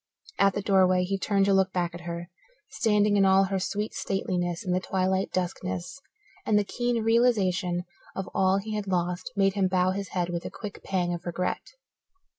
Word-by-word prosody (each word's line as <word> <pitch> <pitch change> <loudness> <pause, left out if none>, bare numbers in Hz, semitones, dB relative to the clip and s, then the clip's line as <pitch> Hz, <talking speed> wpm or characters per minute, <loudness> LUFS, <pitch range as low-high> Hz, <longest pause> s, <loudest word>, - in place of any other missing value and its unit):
At 195 -1 +4
the 205 - -2
doorway 185 -2 +4
he 195 +2 -2
turned 195 0 +2
to 200 - +3
look 190 0 +3
back 175 -2 -1
at 175 - -8
her, 170 +1 -6 0.4
standing 210 -2 +2
in 200 - +5
all 190 0 +5
her 195 0 -1
sweet 205 +3 -3
stateliness 180 -3 -2
in 180 - -1
the 180 - +2
twilight 190 0 0
duskness, 185 +5 -3 0.4
and 215 - +2
the 210 - +3
keen 240 +2 -1
realization 200 -6 +2 0.3
of 195 - -4
all 190 0 +3
he 215 +2 -4
had 210 -1 -3
lost 180 0 -1
made 195 -1 +3
him 195 -2 +2
bow 185 0 +2
his 195 0 -3
head 180 -2 -1
with 170 -1 -3
a - - -5
quick 210 -3 -8
pang 180 -2 -1
of 175 +1 -6
regret. 180 - -3
190 Hz, 195 wpm, -27 LUFS, 180-200 Hz, 0.4 s, in